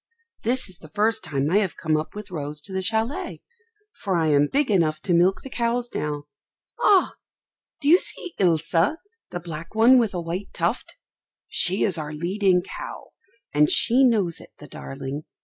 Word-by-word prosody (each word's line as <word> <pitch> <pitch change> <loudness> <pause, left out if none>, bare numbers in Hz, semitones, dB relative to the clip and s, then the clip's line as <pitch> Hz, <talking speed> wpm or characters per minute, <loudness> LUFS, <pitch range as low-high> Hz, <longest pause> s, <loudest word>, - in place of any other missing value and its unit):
This 250 +3 0
is 185 -2 -8
the 155 - -13
first 215 +6 0
time 145 -2 -1
I 200 - +4
have 195 -5 -2
come 155 -1 0
up 155 +5 -3
with 210 -2 -8
Rose 150 -2 -5
to 190 - -7
the 190 - -1
châlet, 225 - -2 0.5
for 195 -3 -3
I 160 -1 +1
am 145 0 +4
big 280 -4 +1
enough 160 -5 +2
to 175 - 0
milk 180 +3 +3
the 270 - -8
cows 240 0 -1
now. 150 -1 -3 0.6
Ah! 390 -3 +4 0.7
do 280 - -2
you 345 +5 +7
see 355 - -4
Ilse, 165 -4 +2 0.6
the 175 - -5
black 165 +2 -8
one 240 +4 +6
with 220 -5 0
a - - -1
white 175 +4 -4
tuft? - - -2 0.5
She 185 +3 +2
is 185 -5 +1
our 150 0 -5
leading 180 +3 +1
cow, - - -8 0.4
and 150 0 +4
she 255 +4 +5
knows 205 -9 +2
it, - - -14
the - - -12
darling. 135 - -7
185 Hz, 185 wpm, -24 LUFS, 155-225 Hz, 0.7 s, you